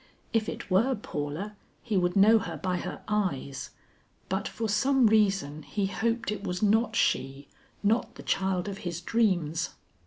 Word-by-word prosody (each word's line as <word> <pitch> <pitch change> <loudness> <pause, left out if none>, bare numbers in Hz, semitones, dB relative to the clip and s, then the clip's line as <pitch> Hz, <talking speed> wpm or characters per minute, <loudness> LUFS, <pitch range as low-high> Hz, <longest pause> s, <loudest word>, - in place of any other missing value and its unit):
If 220 -1 +1
it - - -7
were 235 +8 +4
Paula, 170 +1 -5 0.3
he 220 -4 -2
would 175 -1 +2
know 215 +3 +7
her - - -5
by 185 -1 -1
her - - -6
eyes, 175 -10 -1 0.6
but 190 +1 -1
for 225 - -3
some 260 +5 +3
reason 195 -9 +2
he 200 +6 -2
hoped 230 +4 -1
it 210 - -4
was 180 0 -2
not 220 +2 +3
she, 135 -6 0 0.4
not 220 +4 +1
the - - -10
child 190 -1 0
of 195 -1 -5
his 170 -2 -4
dreams. 180 -5 0
200 Hz, 160 wpm, -28 LUFS, 175-220 Hz, 0.6 s, know